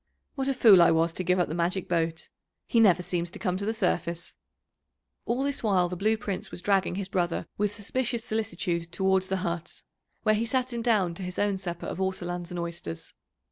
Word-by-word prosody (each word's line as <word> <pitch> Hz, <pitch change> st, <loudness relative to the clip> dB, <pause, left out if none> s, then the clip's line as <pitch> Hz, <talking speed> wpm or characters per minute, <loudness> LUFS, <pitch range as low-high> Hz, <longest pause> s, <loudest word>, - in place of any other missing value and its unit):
What 270 Hz, -2 st, -2 dB
a 275 Hz, -, +1 dB
fool 210 Hz, -7 st, +8 dB
I 170 Hz, -, +7 dB
was 165 Hz, 0 st, +2 dB
to 185 Hz, -, -3 dB
give 180 Hz, +1 st, +2 dB
up 180 Hz, -, +2 dB
the 155 Hz, -, -4 dB
magic 175 Hz, +2 st, -1 dB
boat! 165 Hz, -1 st, -1 dB, 0.4 s
He 230 Hz, -, +2 dB
never 185 Hz, -5 st, +5 dB
seems 175 Hz, -1 st, -2 dB
to -, -, -9 dB
come 185 Hz, -4 st, -1 dB
to 200 Hz, +2 st, -3 dB
the -, -, +2 dB
surface." 170 Hz, -4 st, -1 dB, 0.9 s
All 245 Hz, +3 st, 0 dB
this 280 Hz, 0 st, -1 dB
while 190 Hz, -5 st, +2 dB
the 180 Hz, -, -4 dB
Blue 215 Hz, +5 st, +1 dB
Prince 200 Hz, -3 st, -3 dB
was 175 Hz, -, -9 dB
dragging 195 Hz, -3 st, +2 dB
his 195 Hz, -1 st, -3 dB
brother 175 Hz, -3 st, -1 dB
with 205 Hz, 0 st, 0 dB
suspicious 235 Hz, +3 st, -2 dB
solicitude 175 Hz, -7 st, -2 dB
towards 190 Hz, +1 st, +2 dB
the 190 Hz, -, 0 dB
hut, 170 Hz, -1 st, -4 dB, 0.4 s
where 215 Hz, -, +4 dB
he 215 Hz, +2 st, +1 dB
sat 255 Hz, +1 st, 0 dB
him 235 Hz, -, -2 dB
down 210 Hz, -7 st, +2 dB
to 170 Hz, -, -8 dB
his 180 Hz, 0 st, -5 dB
own 205 Hz, -1 st, +1 dB
supper 175 Hz, -2 st, -5 dB
of -, -, -5 dB
ortolans 175 Hz, -2 st, -2 dB
and 180 Hz, -1 st, -4 dB
oysters. 170 Hz, -, -6 dB
185 Hz, 215 wpm, -27 LUFS, 175-215 Hz, 0.9 s, fool